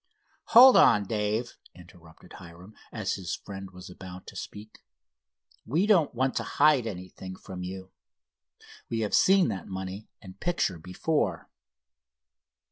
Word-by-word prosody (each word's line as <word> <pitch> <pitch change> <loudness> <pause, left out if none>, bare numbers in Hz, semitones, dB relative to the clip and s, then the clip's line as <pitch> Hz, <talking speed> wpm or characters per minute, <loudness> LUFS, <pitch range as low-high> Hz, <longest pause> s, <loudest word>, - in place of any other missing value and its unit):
"Hold 255 +3 +8
on, 105 -2 +5
Dave," 105 +3 -3 0.2
interrupted 85 -2 -17
Hiram, 90 +4 -13 0.2
as 110 -4 -3
his 90 -4 -4
friend 95 -1 -9
was 90 -1 -12
about 90 0 -11
to - - -12
speak; 105 +1 -9 0.8
"we 160 - 0
don't 180 - +3
want 130 +2 0
to - - -1
hide 145 -5 +4
anything 95 -1 -8
from 95 -1 -9
you. 95 +1 -7 1.0
We 115 -1 -2
have 105 - -2
seen 190 -1 +4
that 95 - -5
money 95 +2 -7
and 95 -1 -13
picture 170 - -1
before." 95 - -2
100 Hz, 130 wpm, -27 LUFS, 95-120 Hz, 1.0 s, Hold